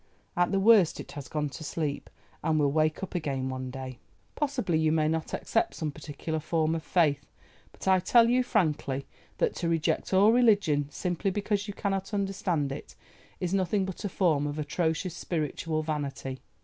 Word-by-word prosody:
At 175 0 +2
the 195 - +2
worst 200 -4 +5
it - - -8
has 145 -2 -7
gone 150 0 -2
to 160 +3 -8
sleep, 150 -2 -3 0.3
and 160 0 +2
will 145 -2 +3
wake 155 +3 +1
up 190 - -5
again 140 -6 -2
one 130 0 -4
day. 130 -1 -7 0.3
Possibly 255 - 0
you 160 -1 +3
may 155 -1 +2
not 160 0 -1
accept - - 0
some 155 -2 -2
particular 155 +2 -5
form 160 0 0
of 165 - -2
faith, 150 -4 +1 0.4
but - - -10
I 190 -1 +5
tell 230 +6 +5
you 250 +2 +3
frankly 150 - 0 0.3
that - - +1
to 170 - -1
reject 165 -1 0
all 195 +3 +6
religion 200 - +3
simply 180 +4 -1
because 205 +1 -1
you 205 - -6
cannot 195 +1 -2
understand 185 -7 -1
it, 135 - -8 0.4
is 180 0 -2
nothing 190 +1 +1
but 190 +2 -6
a 205 - -1
form 160 -6 +2
of 145 +1 -4
atrocious 160 +3 -1
spiritual 155 -1 -2
vanity. 140 -4 -4
160 Hz, 180 wpm, -28 LUFS, 150-195 Hz, 0.4 s, all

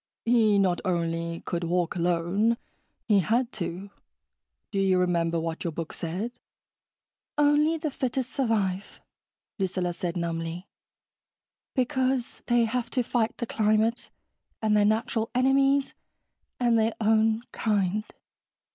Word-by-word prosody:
"He 225 -3 +4
not 185 -3 +2
only 170 -2 -1
could 175 -1 -3
walk 175 0 0
alone, 180 +6 +1 0.5
he 210 -3 +5
had 235 +6 +1
to. 190 0 -5 0.8
Do 195 - -1
you 190 -1 +3
remember 170 -2 +1
what 165 0 -4
your 170 - -2
book 160 0 -5
said?" 185 +8 -3 1.1
"Only 295 +2 +4
the 305 -2 -3
fittest 255 -1 -2
survive," 210 -7 -1 0.6
Lucilla 185 -2 -1
said 170 0 -3
numbly. 170 +2 -3 1.1
"Because 260 -1 0
they 240 -1 +4
have 235 +1 -2
to 250 -1 0
fight 230 -1 0
the 235 - -2
climate... 220 +1 +1 0.5
and 215 -1 +2
their 205 -1 +4
natural 220 +1 0
enemies... 270 +2 +3 0.7
and 240 -2 +3
their 220 +1 +1
own 220 +1 +3
kind." 210 -1 0
215 Hz, 120 wpm, -27 LUFS, 175-240 Hz, 1.1 s, he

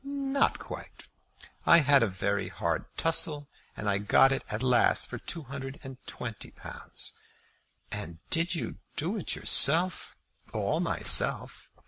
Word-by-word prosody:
"Not 275 0 0
quite. - - -10 0.6
I 170 - +6
had 145 -1 +4
a 115 - +3
very 100 0 -2
hard 85 - -2
tussle, 150 -3 0 0.3
and 100 0 -2
got 135 - +5
it 135 - -1
at 105 +4 -2
last 125 -2 +3
for - - -8
two 165 -2 -6
hundred 135 +1 -8
and 130 -1 -10
twenty 115 -4 -7
pounds." - - -7 0.8
"And 85 +1 -5
did 170 +2 +2
you 165 - -5 0.2
do 175 +8 -1
it - - -2
yourself?" 170 +6 +3 0.4
"All - - -1
myself. - - +3
140 Hz, 135 wpm, -28 LUFS, 110-165 Hz, 0.8 s, I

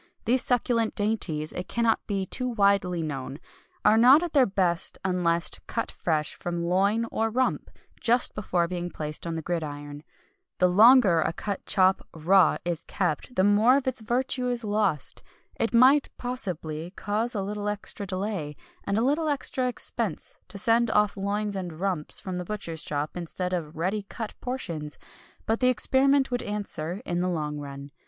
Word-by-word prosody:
These 250 +2 +2
succulent 240 -2 +1
dainties, 190 -8 -1
it 180 - -5
cannot 230 -1 +1
be 195 -2 -1
too 255 +6 -1
widely 200 -6 +2
known, 135 -2 -5 0.5
are 220 - +6
not 265 +7 +7
at 345 - -4
their 275 -4 +5
best 180 -3 +1
unless 175 -2 +1 0.2
cut 230 - -2
fresh 155 -3 -1
from 170 -1 -4
loin 200 +6 +2
or 225 0 0
rump, 255 +3 0 0.3
just 240 +1 +2
before 180 -4 0
being 175 0 -4
placed 155 0 -5
on 165 - -3
the 160 - -4
gridiron. 145 -4 -4 0.6
The 180 - +4
longer 210 -2 +6
a - - 0
cut 200 +3 -5
chop 190 -1 +3
(raw) 175 +3 +4
is 170 -2 -2
kept 155 - -2
the 185 - +3
more 210 +6 +5
of 275 - -3
its 255 -2 -1
virtue 250 +2 0
is 245 -1 -2
lost. 205 -8 0 0.4
It 230 - +1
might, 260 +5 +5
possibly, 175 -10 -4
cause 220 +4 -2
a 200 - -1
little 205 +1 -3
extra 205 -1 -4
delay, 185 -6 -3 0.3
and 200 - -1
a 225 - +2
little 305 +4 +1
extra 260 -2 0
expense, 250 - -4
to 200 - -8
send 230 +3 +2
off 210 -1 +2
loins 205 +1 -2
and 175 -4 -5
rumps 185 -5 0
from 185 -2 -5
the 180 - -3
butcher's 170 -5 -4
shop, 145 +1 -3
instead 180 +1 -4
of 160 -3 -4
ready 190 +6 -1
cut 225 -3 -6
portions, 165 - -5 0.5
but 225 +1 0
the 255 - +3
experiment 265 +3 +3
would 245 - 0
answer, 200 -2 -4
in 175 -1 -1
the 180 - 0
long 150 -4 -3
run. 140 0 -8
200 Hz, 170 wpm, -26 LUFS, 170-230 Hz, 0.6 s, not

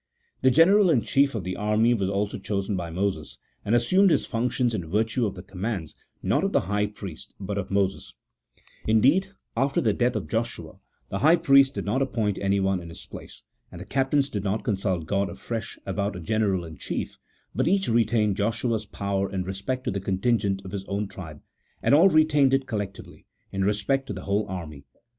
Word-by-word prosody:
The 130 - +5
general 185 +8 +5
in 130 -8 +3
chief 140 -1 +2
of 105 - -3
the 90 +1 -3
army 105 +3 +2
was 100 -5 0
also 100 +1 -2
chosen 100 +1 -2
by 85 -2 -3
Moses, 85 -3 -3 0.3
and 110 - +1
assumed 185 - +4
his - - +2
functions 120 +1 0
in 90 -7 -4
virtue 110 +4 +1
of 100 - -5
the 90 - -9
commands, 95 - -4 0.3
not - - +1
of - - 0
the - - +4
high 105 +3 0
priest, 100 -5 -9
but 100 0 -4
of 100 -2 -3
Moses: 95 -1 -1 0.7
in 110 0 +4
deed, 185 - +4 0.3
after 135 +4 +1
the 110 -3 +2
death 120 +3 +1
of 95 -8 -3
Joshua, 110 -5 -3 0.3
the 100 - -3
high 160 +8 +6
priest 140 -5 +5
did - - -3
not 120 +7 0
appoint 110 -6 -1
anyone 95 -1 +1
in 85 - -9
his 85 - -11
place, - - -11 0.3
and 85 - -9
the 90 - -8
captains 135 +4 +1
did 100 -2 -3
not 105 +2 -1
con 105 - 0
sult 95 -4 -2
God 100 +3 0
afresh 115 -2 -5
about 100 +1 -2
a - - -5
general 100 -1 0
in 80 -1 -10
chief, - - -4 0.3
but 130 +5 0
each 190 +2 +2
retained 110 -3 +2
Joshua's 115 0 -1
power 100 0 -2
in 95 -1 -2
respect 100 +8 -4
to - - -1
the 100 0 -3
contingent 100 0 0
of 95 - -7
his 100 -1 -4
own 100 +1 -2
tribe, 80 -7 -10 0.4
and - - +3
all 165 +7 +7
retained 150 -5 +4
it 135 0 -1
collectively, 105 -6 -6 0.2
in 95 0 -1
respect 105 +7 0
to - - -4
the - - -7
whole 100 +1 0
army. 80 -6 -6
105 Hz, 200 wpm, -26 LUFS, 95-125 Hz, 0.7 s, all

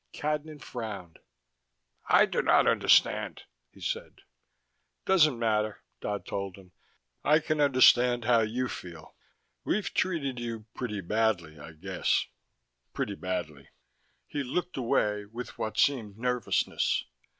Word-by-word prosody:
Cadnan 150 0 -3
frowned. 105 -11 -7 0.9
"I - - +7
do - - -1
not - - +4
understand," - - +3 0.3
he - - -19
said. - - -4 0.8
"Doesn't 155 -9 +4
matter," 110 -2 0 0.2
Dodd 105 -1 -4
told 100 -2 -4
him. 95 -2 -16 0.5
"I 150 - +5
can 155 -1 -1
understand 125 -3 +5
how 120 0 +5
you 115 +4 0
feel. 85 -8 -9 0.5
We've 210 - -1
treated 140 -9 -1
you 115 -2 -5
pretty 105 -5 -4
badly, 90 -6 0
I 80 +3 -10
guess. 75 - 0 0.7
Pretty 100 - -2
badly." 90 -7 -5 0.6
He 145 - -4
looked 175 +7 -3
away 105 -5 0
with 115 +4 -8
what 110 - -3
seemed 110 -8 +1
nervousness. 125 0 0
115 Hz, 120 wpm, -29 LUFS, 100-130 Hz, 0.9 s, I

